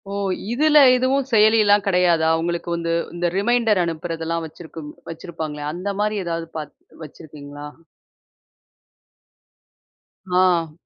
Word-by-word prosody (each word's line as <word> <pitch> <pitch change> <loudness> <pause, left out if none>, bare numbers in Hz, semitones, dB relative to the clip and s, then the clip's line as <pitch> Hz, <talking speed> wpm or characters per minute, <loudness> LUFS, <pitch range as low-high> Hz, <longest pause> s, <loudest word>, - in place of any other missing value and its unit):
ஓ! - - -5 0.4
இதில 300 +5 +3 0.2
எதுவும் 260 +2 +1
செயலிலாம் 210 -2 +4
கிடையாதா? 175 -4 +3
உங்களுக்கு 170 +1 -3
வந்து 165 0 -2 0.2
இந்த 175 0 0
ரிமைண்டர் 225 -2 +2
அனுப்புறதெல்லாம் 165 0 -3
வச்சிருக்கும் 160 -1 -10 0.2
வச்சிருப்பாங்களே 160 -3 -6
அந்த 180 +4 -4
மாரி 210 0 0
ஏதாவது 165 -1 -3
பாத் 150 -2 -7 0.3
வச்சிருக்கீங்களா? 145 -1 -11 2.6
ஆ. 180 -3 +2
170 Hz, 100 wpm, -21 LUFS, 160-210 Hz, 2.6 s, செயலிலாம்